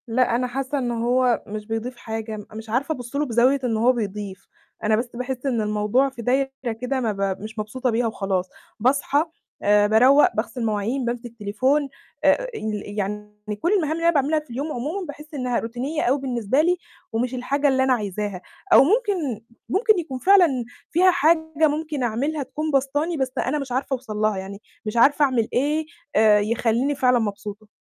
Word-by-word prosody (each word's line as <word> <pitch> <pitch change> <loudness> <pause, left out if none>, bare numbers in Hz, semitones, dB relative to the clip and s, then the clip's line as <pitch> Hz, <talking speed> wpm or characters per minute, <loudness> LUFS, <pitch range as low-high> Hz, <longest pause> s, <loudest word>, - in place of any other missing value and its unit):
لأ، 240 +1 +2
أنا 250 +1 0
حاسة 270 +3 -3
إن 245 -3 -1
هو 240 +1 +1
مش 210 0 -6
بيضيف 230 +2 -4
حاجة، 220 -1 -5
مش 220 0 -8
عارفة 270 +7 0
أبُصّ 245 0 -9
له 295 +1 +1
بزاوية 250 +2 +3
إن 230 -3 0
هو 235 +3 +4
بيضيف، 205 -4 -5 0.4
أنا 215 0 +3
بس 240 +3 -2
باحس 250 +1 -4
إن 245 -5 +1
الموضوع 210 +5 +1
في 255 -3 -9
دايرة 265 +3 +1 0.3
كده 260 +1 -1
ما 230 -4 0
ب 195 -1 -2
مش 220 +1 -7
مبسوطة 250 +5 -2
بيها 230 +1 +1
وخلاص، 195 -4 -2 0.3
باصحى، 280 +5 +2 0.4
آآ، 205 0 +4
باروّق، 255 +7 +5
باغسل 230 +2 -2
مواعين، 220 +5 -1
بامسك 240 0 -4
تليفون، 260 +8 +1 0.3
آآ، - - +4
ال 215 - -3 0.2
يعني 210 +1 -5
كُلّ 345 - +1
المهام 325 -7 +1
اللي 330 +1 -2
أنا 335 - +5
باعملها 300 +1 +2
في 300 - -17
اليوم 275 +6 -4
عمومًا 310 +11 -3
باحس 300 +1 -10
إنها 250 -4 -1
روتينية 255 +7 -3
أوي 270 +4 +2
بالنسبة 255 0 +1
لي، 355 +3 +2 0.3
ومش 245 +3 -1
الحاجة 275 +3 0
اللي 265 -1 +3
أنا 260 -1 +3
عايزاها. 205 -4 -3 0.3
أو - - +9
ممكن 355 - 0 0.3
ممكن 425 - +3
يكون 270 -6 -5
فعلًا 375 +2 +6 0.4
فيها 365 +3 +5
حاجة 320 -1 +3
ممكن 300 -2 -2
أعملها 275 +6 -1
تكون 300 +4 -4
باسطاني، 290 +5 0
بس 265 -2 -1
أنا 295 +4 0
مش 275 -3 -6
عارفة 265 +2 -1
أوصل 245 -5 -4
لها 215 -1 +1
يعني، 195 +2 -7 0.2
مش 215 +2 -3
عارفة 290 +5 +5
أعمل 245 -5 +1
إيه، 300 +5 +1 0.3
آآ، 215 -1 +6
يخليني 230 +5 +1
فعلًا 250 -2 +3
مبسوطة. 210 0 -5
250 Hz, 185 wpm, -23 LUFS, 220-285 Hz, 0.4 s, أو